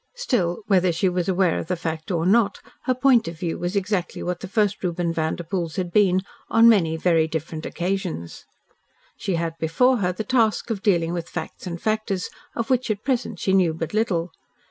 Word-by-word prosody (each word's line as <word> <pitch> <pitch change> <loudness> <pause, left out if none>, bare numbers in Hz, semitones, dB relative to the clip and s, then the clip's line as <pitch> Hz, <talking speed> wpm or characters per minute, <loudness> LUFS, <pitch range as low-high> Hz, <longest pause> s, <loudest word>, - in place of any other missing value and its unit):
Still, 220 - -1
whether 185 -4 +3
she 170 +4 +1
was 180 0 0
aware 185 -2 +2
of - - -6
the 180 - 0
fact 160 -2 -4
or 170 -3 0
not, 205 +1 +3 0.3
her 255 - +2
point 255 -3 +4
of 165 -1 -6
view 170 0 -3
was 175 +3 -3
exactly 200 -2 -1
what 180 0 -2
the - - -6
first 205 0 0
Reuben 175 -1 -1
Vanderpoel's 165 +1 -2
had 180 -3 -2
been 190 -2 +4 0.3
on 225 +1 +6
many 170 -8 +4
very 165 -1 +3
different 160 0 -4
occasions. 180 - -3 0.7
She 190 - -2
had 165 -1 -1
before 250 +11 +3
her 180 -4 0
the 185 +4 -4
task 230 -2 +1
of 205 -4 -2
dealing 170 -5 +2
with 170 -1 -4
facts 160 +2 -6
and 170 -1 -4
factors 215 -3 -1 0.2
of 230 +2 -2
which 255 -1 +1
at 210 -1 -2
present 250 -5 -1
she 190 - 0
knew 180 -4 +3
but 165 +1 -4
little. 185 -6 0
185 Hz, 195 wpm, -23 LUFS, 170-215 Hz, 0.7 s, on